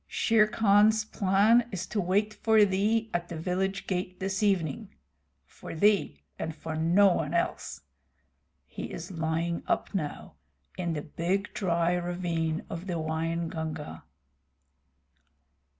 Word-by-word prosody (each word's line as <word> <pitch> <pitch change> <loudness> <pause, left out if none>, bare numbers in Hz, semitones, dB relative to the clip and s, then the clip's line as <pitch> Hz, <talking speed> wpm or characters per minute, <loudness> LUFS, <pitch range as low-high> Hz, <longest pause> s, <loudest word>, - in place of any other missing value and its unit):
Shere 220 -2 +3
Khan's 215 0 +4
plan 215 +4 +3
is 185 -2 -4
to 205 +3 -2
wait 205 +4 +1
for 220 0 +4
thee 215 +3 0
at 175 0 -2
the 170 - -5
village 190 +4 -2
gate 185 -1 -3
this 195 +2 -2
evening 195 -1 0 0.6
for - - -10
thee 190 - +2 0.2
and 160 - -4
for 160 -1 -6
no 175 +5 +4
one 160 0 -2
else. 170 - -2 0.8
He - - -7
is - - -7
lying 165 0 -1
up - - -1
now, 155 -7 -4 0.4
in 175 -2 -2
the 150 -2 -4
big 180 +6 -2
dry 170 -2 +1
ravine 175 -2 -2
of 170 +3 -7
the 175 -2 -2
Waingunga." 160 - -3
180 Hz, 130 wpm, -28 LUFS, 165-205 Hz, 0.8 s, Khan's